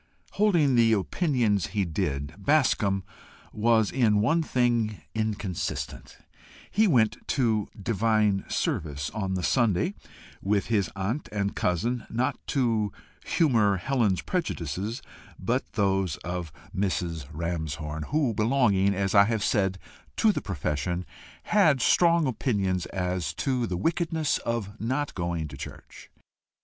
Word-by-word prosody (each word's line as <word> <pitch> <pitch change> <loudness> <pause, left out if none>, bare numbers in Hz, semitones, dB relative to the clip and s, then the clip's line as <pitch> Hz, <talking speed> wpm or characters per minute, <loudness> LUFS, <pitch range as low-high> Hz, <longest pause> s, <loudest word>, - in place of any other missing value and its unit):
Holding 175 -10 +3
the 115 -2 +5
opinions 110 - +1
he 100 - +2
did, 75 -4 -2
Bascombe 100 -6 +2 0.5
was 110 -1 +3
in 115 -5 +3
one 160 +11 +3
thing 120 -7 0
inconsistent: 105 -5 -3 0.5
he 215 +2 +4
went 115 - +3
to 110 -6 +1
"divine 105 -1 +1
service" 75 -2 -2
on 95 -3 -2
the 90 - -2
Sunday 120 - +2 0.5
with 100 0 +1
his 100 -5 +2
aunt 105 +9 -3
and 100 -1 -2
cousin 115 +8 -1
not 130 +4 0
to 115 -6 +1 0.3
humour 115 - +3
Helen's 110 -3 +1
prejudices, 105 - -3 0.3
but 120 +8 -2
those 95 -5 +1
of 90 -2 -4 0.2
Mrs. 85 -6 -2
Ramshorn, 80 -2 -4
who, 145 -6 +1
belonging, 105 -4 +2
as 95 0 0
I 100 0 +7
have 110 -1 -1
said, 95 -4 +1 0.4
to 220 - +5
the - - -3
profession, 85 +1 -2 0.4
had 165 -10 +4
strong 170 +4 +4
opinions 100 -7 0
as 90 -2 -2
to 130 -4 0
the 90 - -2
wickedness 160 - 0
of 110 -3 -4
not 130 +6 -1
going 85 -3 -2
to 70 - -9
church. - - -10
105 Hz, 125 wpm, -27 LUFS, 95-125 Hz, 0.5 s, I